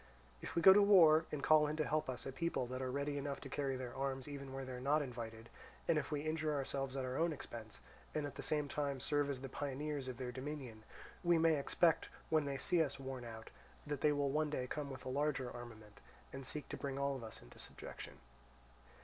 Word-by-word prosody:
If - - -6
we 170 - +2
go 190 - +11
to 205 - +7
war, 165 -6 +7
and 145 -2 -3
call 155 -1 +6
in 150 - -1
to 155 -1 0
help 155 -2 0
us 125 -1 -3
a 135 - -3
people 135 -1 -1
that 130 +1 -4
are 130 - -1
ready 140 +2 -1
enough 140 0 -3
to 135 - -7
carry 135 -1 -1
their 125 -2 -6
arms 135 0 -2
even 140 -2 -6
where 135 0 -4
they 130 - -6
are 125 - -5
not 145 +3 +3
invited; 115 -3 -6 0.4
and 160 -2 +4
if 150 - -5
we 145 -1 0
injure 155 0 0
ourselves 135 -1 -2
at 130 - -1
our 130 +1 -2
own 165 +1 +2
expense, 115 -7 -7 0.4
and 150 -1 0
at 145 - -5
the - - -6
same 150 -1 0
time 140 -1 -1
serve 145 +2 +1
as 135 -2 -3
the 135 - -4
pioneers 140 +1 -3
of 125 -2 -5
their 125 -1 -3
dominion, 130 -4 -6 0.4
we 175 -1 +5
may 165 -1 +5
expect, 160 +3 +3 0.2
when 155 -2 +4
they 140 -1 -2
see 175 +4 +2
us 145 -3 -1
worn 130 -2 -5
out, 110 -1 -8 0.3
that 145 -2 -3
they 150 - +5
will 145 -1 +1
one 155 +1 +1
day 130 -4 -1
come 145 +2 -3
with 130 -1 -8
a - - -5
larger 135 -1 0
armament, 110 -3 -10 0.3
and 135 -1 -5
seek 150 +1 -6
to - - -4
bring 135 -1 -3
all 140 0 +1
of 130 - -6
us 110 - -7
into - - -15
subjection. - - -8
140 Hz, 240 wpm, -38 LUFS, 130-150 Hz, 0.4 s, go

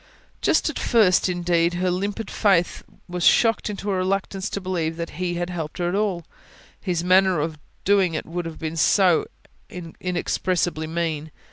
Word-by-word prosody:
Just - - +2
at - - -3
first, 200 -6 +3
indeed, 175 -1 +1
her 180 +1 0
limpid 200 +4 -3
faith 190 -5 +2 0.3
was 175 -1 -4
shocked 225 -2 +4
into 205 0 -3
a 190 - 0
reluctance 195 +1 -1
to - - -3
believe 170 -4 -2
that 170 0 -4
He 175 -1 -1
had 175 +1 -3
helped 160 -3 -5
her 175 -1 -1
at 175 - -1
all: 195 -5 -1 0.5
His 175 -4 -2
manner 185 -1 +4
of 155 0 -3 0.3
doing 195 -4 +3
it - - -3
would 175 0 -4
have 165 - -8
been 160 0 -5
so 180 +1 +4 0.4
inexpressibly 175 -1 -2
mean. 160 -2 -2
180 Hz, 165 wpm, -23 LUFS, 170-190 Hz, 0.5 s, shocked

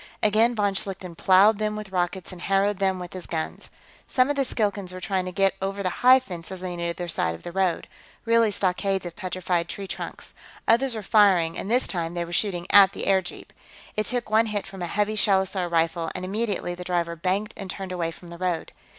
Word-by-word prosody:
Again, 220 +3 +4
von 205 -2 +1
Schlichten 190 -3 -3
plowed 195 +5 +5
them 210 0 -1
with 210 -2 -7
rockets 180 0 -2
and 180 -2 -10
harrowed 195 +1 +1
them 190 -1 +1
with 180 -1 -8
his 185 -1 -7
guns. 160 -2 -4 0.4
Some 255 +2 +2
of - - -2
the 275 - +2
Skilkans 205 -6 -2
were 185 - -7
trying 185 -1 -1
to 185 - -4
get 195 +1 +2
over 195 +1 -2
the 185 - 0
high 255 +1 +8
fences 185 -4 -8
on 175 -1 -4
either 170 +1 -3
side 85 - 0
of 85 - -14
the - - -6
road 185 -1 0 0.4
really 230 -1 +4
stockades 195 -1 0
of 170 -1 -6
petrified 180 -3 -2
tree 200 - -5
trunks. - - -7 0.3
Others 240 +2 +3
were 215 - -5
firing, 190 -6 +4
and 195 - -5
this 250 +3 +3
time 170 -2 -3
they 170 0 -1
were 170 - -8
shooting 175 -2 0
at 195 -1 +8
the - - -4
airjeep. 190 -2 0 0.4
It 215 - -1
took 245 -3 -2
one 220 +1 +4
hit 210 -2 -2
from 195 -1 -9
a 175 - -2
heavy 210 +4 0
shellosaur 190 -3 +1
rifle, 165 0 +1
and, 185 - -4
immediately, 200 -2 -2
the 180 +1 -7
driver 175 -2 -1
banked 190 +5 -1
and 195 -2 -7
turned 190 0 -5
away 175 -2 -1
from 170 +1 -11
the 170 0 -10
road. 180 -3 -2
190 Hz, 220 wpm, -25 LUFS, 175-210 Hz, 0.4 s, high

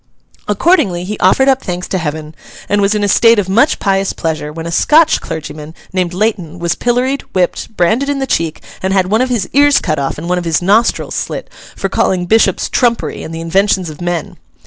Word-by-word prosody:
Accordingly, 205 - +2
he 205 +3 -5
offered 230 +9 +3
up 265 -1 +3
thanks 180 0 -4
to 190 - -1
Heaven, 155 -1 -5 0.3
and 205 0 +1
was 200 +1 +2
in 210 - 0
a - - +2
state 230 +3 +5
of 205 -3 0
much 230 +10 +3
pious 195 0 0
pleasure, 155 -2 -3
when 165 +1 -7
a 170 - -4
Scotch 315 - +4
clergyman, 155 0 -7 0.2
named 180 -2 0
Leighton, 180 -4 -2
was 170 0 -1
pilloried, 250 +7 0
whipped, 185 +4 -1
branded 225 +11 +1
in 285 - 0
the 270 - -1
cheek, 165 -10 -2 0.2
and 190 0 -1
had 190 -1 +1
one 220 +3 +3
of 255 - 0
his 230 -7 -1
ears 285 0 +5
cut 155 -3 -2
off 140 - -2
and 160 +3 -6
one 180 0 0
of 175 - -6
his 165 -3 +1
nostrils 205 +6 +1
slit, - - -4 0.2
for - - -2
calling 180 -1 0
bishops 220 +5 +2
trumpery 240 -2 0
and - - -7
the 165 0 -5
inventions 185 0 +1
of 150 - -12
men. 175 -3 -3
190 Hz, 215 wpm, -14 LUFS, 170-225 Hz, 0.3 s, state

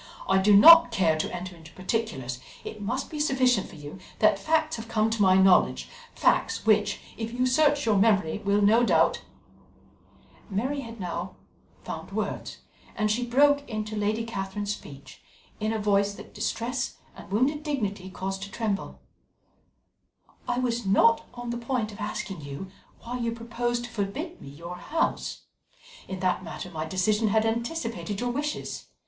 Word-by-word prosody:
I 190 0 +4
do 205 +2 +5
not 330 +4 +10
care 180 -8 +2
to - - -2
enter 180 0 -6
into 160 -1 -14
particulars; 185 - -3 0.2
it 215 - -8
must 235 +6 -3
be 305 - -5
sufficient 255 -7 +2
for - - -12
you 150 +4 -9 0.2
that 215 -2 +4
facts 315 +5 +1
have 225 0 -7
come 220 -1 +1
to 225 -1 -1
my 190 -2 +6
knowledge 65 - +4 0.3
facts - - +1
which, 210 -2 +3 0.2
if 225 0 -4
you 250 +2 0
search 290 +2 +3
your 215 -3 +3
memory, 200 -4 +2
will 205 0 +1
no 220 +4 +5
doubt - - +3 0.7
" - - -29
Mary 250 +9 -1
had 230 -3 -8
by 190 - -5
now 175 +1 -4 0.5
found - - -7
words, - - -3 0.4
and 215 -1 +1
she 240 +3 0
broke 285 +4 +4
into 215 -1 -4
Lady 210 +2 0
Catherine's 205 -1 -3
speech 140 -8 -12 0.4
in 215 0 -1
a 225 - -1
voice 200 -1 +1
that - - -12
distress 245 +2 -2 0.2
and - - -12
wounded 265 +8 +1
dignity 210 -11 -3
caused 190 +1 -4
to 200 +1 -7
tremble: 210 -2 -3 1.5
"I 245 - 0
was 240 -2 0
not 225 +4 +4
on 240 0 -5
the 240 - -3
point 235 -3 -2
of 205 - -12
asking 195 -4 -4
you 145 +7 -7 0.3
why 245 +2 -5
you 235 -1 -1
propose 235 +1 -2
to 240 - -7
forbid 265 - -4
me - - -9
your 170 +5 -8
house. 320 - -2 0.7
In 190 -1 -6
that 185 0 0
matter - - -7
my 155 -1 -4
decision 210 +6 +1
had 220 +1 +2
anticipated 230 -3 -2
your 245 0 -1
wishes. 295 +4 -4
215 Hz, 170 wpm, -27 LUFS, 195-240 Hz, 1.5 s, not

